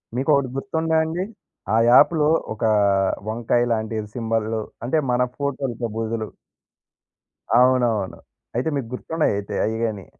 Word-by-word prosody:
మీకొకటి 140 0 +2
గుర్తుందా 160 +1 0
అండి? 165 +3 -2 0.5
ఆ - - +4
యాప్‌లో 150 +4 +5 0.2
ఒక 110 - -7 0.6
వంకాయ 120 +2 +1
లాంటి 110 0 -2 0.2
సింబల్లు 115 -1 -1 0.2
అంటే 155 +6 +1
మన 125 +1 +2 0.2
ఫోటోలతో 135 -4 -2
పొజులు. 110 -1 -2 1.3
అవునవును. 120 -6 +2 0.4
అయితే 130 +6 0
మీకు 135 -5 -3
గుర్తున్నాయి 160 0 -1
అయితే 100 - -5
అయ్యిగాని. 110 -3 -2
120 Hz, 110 wpm, -22 LUFS, 110-140 Hz, 1.3 s, యాప్‌లో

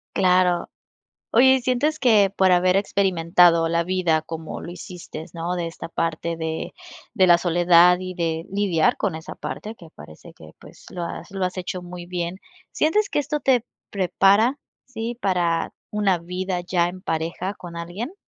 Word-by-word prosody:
Claro. 180 -2 +2 0.6
Oye, 260 +3 +6
y 260 - -1
sientes 260 +5 0
que 215 -6 +4
por 190 -1 +4
haber 180 +1 +3
experimentado 175 -4 +3
la 170 0 +1
vida 175 -3 +1
como 160 0 -7
lo 170 - -7
hiciste, 175 -2 -9
¿no?, 170 +1 -3
de 175 -1 -2
esta 165 - -8
parte 165 0 -2
de 160 0 -4 0.4
de 190 -4 +4
la 175 -1 +7
soledad 175 0 +5
y 185 0 -6
de 165 -2 -2
lidiar 195 -5 +1
con 195 -6 -1
esa 160 - -8
parte 215 - -6
que 170 -6 -14
parece 80 - -13
que - - -15
pues - - -16
lo 175 - -5
has 170 - -7
lo 195 -1 -3
has 180 +1 -4
hecho 180 0 -4
muy 175 0 -9
bien. 175 0 -4 0.3
¿Sientes 405 +7 +1
que - - -2
esto 295 +1 -2
tep 255 -5 +2 0.3
prepara? 200 +6 +3 0.3
¿sí? 235 -1 -5
¿para 175 -5 0 0.2
una 205 -3 +1
vida 180 +2 -3
ya 175 -1 +1
en 185 +1 -8
pareja 170 +2 -3
con 175 -2 -10
alguien? 175 - -6
180 Hz, 170 wpm, -23 LUFS, 170-200 Hz, 0.6 s, la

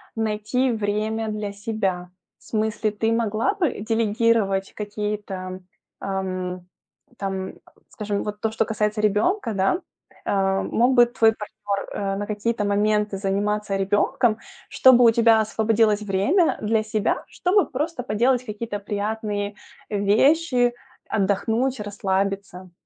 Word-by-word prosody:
найти 225 +4 0
время 215 +1 -1
для 210 -1 -4
себя? 200 -4 -2 0.3
В - - -25
смысле, 220 0 -1
ты 220 +2 -1
могла 230 - +1
бы 340 - -1
делегировать 220 -3 +1
какие-то, 205 -3 -5 0.4
ам, 185 -2 -4 0.5
там 190 -1 -3 0.4
скажем, 205 -2 -3
вот 210 0 -6
то, 220 - +1
что 225 0 0
касается 210 -1 -1
ребёнка, 220 - +1
да. 195 - +1 0.5
Э, 195 -1 +1
мог 250 +3 +2
бы 240 0 +8
твой 225 -2 +3
партнёр, 210 -2 -5
э, 195 -1 -2
на 205 - -3
какие-то 210 0 -1
моменты 210 0 +1
заниматься 205 +1 -1
ребёнком, 215 +4 +1 0.3
чтобы 250 -2 +6
у 230 - +7
тебя 230 -1 +5
освободилось 220 -1 +2
время 210 - +2
для 220 +1 +1
себя, 215 -1 -1
чтобы 380 +2 +1
просто 295 +1 -3
поделать 245 +3 +1
какие-то 210 -1 -5
приятные 205 0 -3 0.3
вещи, 245 +5 +3 0.3
отдохнуть, 220 +6 0
расслабиться. 195 -2 -3
210 Hz, 120 wpm, -23 LUFS, 200-230 Hz, 0.5 s, бы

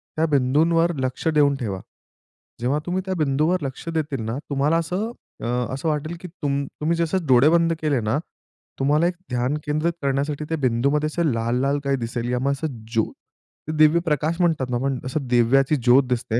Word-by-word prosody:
त्या 160 - +2
बिंदूंवर 160 +5 +2
लक्ष 130 +4 -2
देऊन 145 -3 +4
ठेवा. 105 -8 -4 0.8
जेव्हा 135 +5 +1
तुम्ही 180 +1 -1
त्या 190 - -2
बिंदूवर 155 +4 +1
लक्ष 135 +4 -6
देतील 150 -6 -2
ना 115 +4 -3
तुम्हाला 145 +4 +2
असं 180 +7 -2 0.3
अ, - - -2 0.3
असं 140 +5 -3
वाटेल 155 +3 -2
की 180 - -7
तुम 140 -4 -2 0.2
तुम्ही 165 +2 +1
जसं 170 +1 0
डोळे 130 +3 +6
बंद 165 0 +3
केले 145 -5 +1
ना 110 +6 0 0.6
तुम्हाला 150 +5 +3
एक 180 - -1 0.2
ध्यान 125 +3 0
केंद्रित 155 +3 0
करण्यासाठी 140 +2 -1
त्या 160 - 0
बिंदूमध्ये 140 +4 +1
असं 170 +2 -1
लाल-लाल 125 +5 0
काही 140 0 +1
दिसेल 120 0 -3
यामुळे 130 +3 +1
असं 155 +3 -3 0.3
ज्योत, 110 -1 0 0.5
ते - - -2
दिव्य 155 +2 +6
प्रकाश 155 +2 0
म्हणतात 155 -7 +1
ना 120 - 0
पण 135 -1 0
असं 130 0 -3
दिव्याची 125 +4 +3
ज्योत 125 +1 +5
दिसते. 120 -1 0
145 Hz, 180 wpm, -23 LUFS, 130-160 Hz, 0.8 s, डोळे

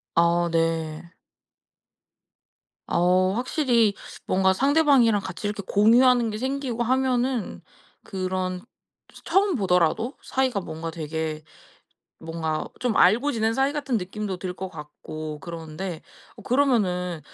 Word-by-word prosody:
아 170 +1 +3
네. 165 0 -1 1.7
어 185 +2 +3
확실히 240 -2 +2 0.3
뭔가 190 0 +3
상대방이랑 275 -5 +4
같이 190 +2 -5
이렇게 205 -1 -4
공유하는 235 +3 +4
게 215 - -4
생기고 260 -2 -2
하면은 255 -1 0 0.4
그런 185 -1 -3 0.5
스 - - -15
처음 390 -1 +2
보더라도 190 - +1
사이가 260 -5 0
뭔가 165 -2 -6
되게 160 -1 -4 0.8
뭔가 160 -1 -3
좀 245 -3 0
알고 235 +11 +4
지낸 225 -1 +1
사이 270 +4 +1
같은 275 -6 -1
느낌도 190 +1 -5
들 180 0 -5
것 190 +1 -5
같고 155 0 -8
그러는데 170 +1 -6 0.4
어 - - -12
그러면은 190 - +1
195 Hz, 250 characters per minute, -24 LUFS, 170-250 Hz, 1.7 s, 상대방이랑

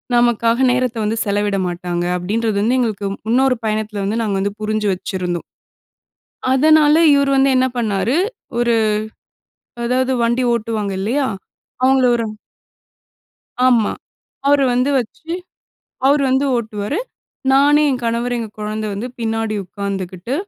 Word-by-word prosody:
நமக்காக 240 +1 +3
நேரத்த 250 -1 0
வந்து 220 +2 -1
செலவிட 205 -1 0
மாட்டாங்க. 175 0 -3
அப்படின்றது 210 +4 -1
வந்து 240 +5 +2
எங்களுக்கு, 210 -5 -1 0.2
இன்னொரு 260 0 +3
பயணத்தில 215 -1 -2
வந்து 220 +4 -1
நாங்க 200 -3 -1
வந்து 200 +1 -1
புரிஞ்சு 215 -1 0
வச்சிருந்தோம். 180 -2 -4 1.1
அதனால 305 +2 +5 0.2
இவரு 280 -1 +2
வந்து 270 0 +4
என்ன 260 0 +3
பண்ணாரு, 220 - 0 0.4
ஒரு 240 -1 +2 1.1
அதாவது 255 +2 +1
வண்டி 235 +2 +1
ஓட்டுவாங்க 215 -3 -2
இல்லையா? 260 +7 0 0.6
அவுங்கள 265 0 +4
ஒரு 230 - -1 1.4
ஆமா. 235 -4 +3 0.5
அவரு 285 -1 +4
வந்து 250 +3 +1
வச்சு, 285 +7 -7 0.8
அவரு 285 +1 +4
வந்து 265 +2 +2
ஓட்டுவாரு. 220 - -3 0.5
நானு, 290 +2 +5
என் 255 -2 -1
கணவரு, 235 +1 -1
எங்க 225 -2 -5
கொழந்தை 215 0 -3
வந்து, 210 +5 -4
பின்னாடி 225 -1 -1
உக்காந்துக்கிட்டு 195 +2 -5
230 Hz, 125 wpm, -18 LUFS, 205-255 Hz, 1.4 s, அதனால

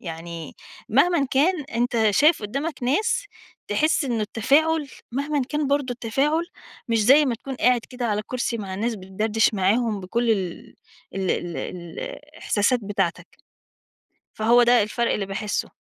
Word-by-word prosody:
يعني 165 -1 -7 0.3
مهمًا 340 -6 +3
كان 300 +3 +2
أنت 235 -3 +1
شايف 300 +4 +4
قُدّامك 275 +7 -4
ناس 300 - +1 0.4
تحسِ 310 -1 +2
إن 235 -4 -1
التفاعُل 285 +8 +2 0.2
مهمًا 285 +1 -1
كان 300 -1 -1
برضه 280 -2 0
التفاعُل 275 +8 0 0.4
مش 230 -1 +2
زي 280 +5 +7
ما 245 - 0
تكون 265 +3 -7
قاعد 250 -1 +3
كده 250 -1 -3
على 210 -1 0
كُرسي 240 0 -3
مع 195 -3 -5
الناس 225 +4 -1
بتدردِش 210 +3 0
معاهم 210 +2 +1
بكل 230 +6 -1
ال 190 -5 -3 0.4
ال 190 -1 -1
ال 175 -1 -2
ال 175 -2 -7
الإحساسات 250 - -1
بتاعتك، 195 -3 -2 1.1
فهو 235 +3 +4
ده 240 -2 +5
الفَرْق 235 +3 -1
اللي 200 - -2
باحسّه. 205 +2 -3
235 Hz, 145 wpm, -23 LUFS, 205-275 Hz, 1.1 s, زي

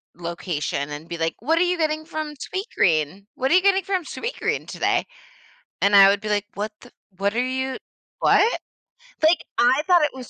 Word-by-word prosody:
location 170 -4 -3
and 150 +3 -7
be 170 - -5
like, 165 0 -1
"What 320 +8 +1
are - - +2
you 360 0 +2
getting 310 -1 0
from 310 -2 -5
Sweetgreen? 195 - -1
What 265 +3 -1
are - - +5
you 370 - +6
getting 390 -1 +3
from 375 -3 -1
Sweetgreen 465 +9 -3
today?" - - 0 0.8
And 200 0 +5
I 195 0 +9
would 200 0 +2
be 215 - -5
like, 205 -1 0
"What 210 +1 -3
the - - -15 0.3
what 200 +2 0
are 245 - +1
you 260 0 -2 0.4
what?" 460 - +3 0.6
Like, 325 +3 +5 0.2
I 255 +4 +4
thought 350 -3 +5
it 295 - +1
was 255 -2 -9
255 Hz, 190 wpm, -23 LUFS, 195-325 Hz, 0.8 s, I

